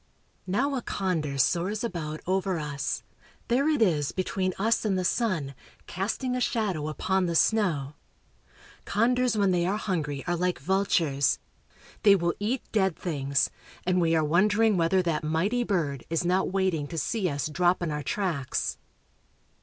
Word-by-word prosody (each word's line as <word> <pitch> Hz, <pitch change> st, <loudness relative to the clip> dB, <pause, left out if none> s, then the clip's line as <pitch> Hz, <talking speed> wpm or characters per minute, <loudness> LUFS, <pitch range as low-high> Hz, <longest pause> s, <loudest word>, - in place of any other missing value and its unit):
Now 255 Hz, +10 st, +1 dB
a 260 Hz, -, -1 dB
condor 165 Hz, -11 st, -2 dB
soars 180 Hz, -, +1 dB
about 155 Hz, -8 st, -4 dB
over 190 Hz, 0 st, 0 dB
us. 145 Hz, -2 st, -3 dB, 0.5 s
There 270 Hz, +5 st, +3 dB
it 295 Hz, -7 st, +3 dB
is 150 Hz, -8 st, +1 dB
between 185 Hz, 0 st, -2 dB
us 225 Hz, +4 st, +1 dB
and 200 Hz, -4 st, +1 dB
the 185 Hz, -, -1 dB
sun, 175 Hz, -, 0 dB, 0.3 s
casting 230 Hz, +7 st, -2 dB
a 250 Hz, -, -1 dB
shadow 195 Hz, -12 st, 0 dB
upon 185 Hz, +4 st, 0 dB
the 170 Hz, -, -1 dB
snow. 165 Hz, -9 st, +2 dB, 0.9 s
Condors 245 Hz, +2 st, +1 dB
when 200 Hz, -2 st, +3 dB
they 175 Hz, -1 st, +2 dB
are 200 Hz, +3 st, 0 dB
hungry 150 Hz, -10 st, -2 dB
are 175 Hz, -, 0 dB
like 180 Hz, +1 st, 0 dB
vultures; 165 Hz, -5 st, +1 dB, 0.6 s
they 200 Hz, -2 st, +7 dB
will 170 Hz, -2 st, 0 dB
eat 230 Hz, +5 st, -1 dB
dead 190 Hz, -5 st, +2 dB
things, 140 Hz, -5 st, 0 dB, 0.3 s
and 180 Hz, 0 st, +2 dB
we 165 Hz, -1 st, +3 dB
are 160 Hz, -1 st, +2 dB
wondering 205 Hz, +7 st, +3 dB
whether 180 Hz, +2 st, +2 dB
that 165 Hz, -3 st, -1 dB
mighty 185 Hz, +11 st, +1 dB
bird 155 Hz, -, -1 dB
is 165 Hz, +1 st, 0 dB
not 180 Hz, +2 st, +1 dB
waiting 185 Hz, -6 st, 0 dB
to 165 Hz, -, -7 dB
see 185 Hz, +5 st, 0 dB
us 140 Hz, -2 st, -2 dB
drop 175 Hz, +3 st, +1 dB
in 165 Hz, -, -1 dB
our 150 Hz, 0 st, -2 dB
tracks. 140 Hz, -, -2 dB
180 Hz, 160 wpm, -27 LUFS, 155-205 Hz, 0.9 s, they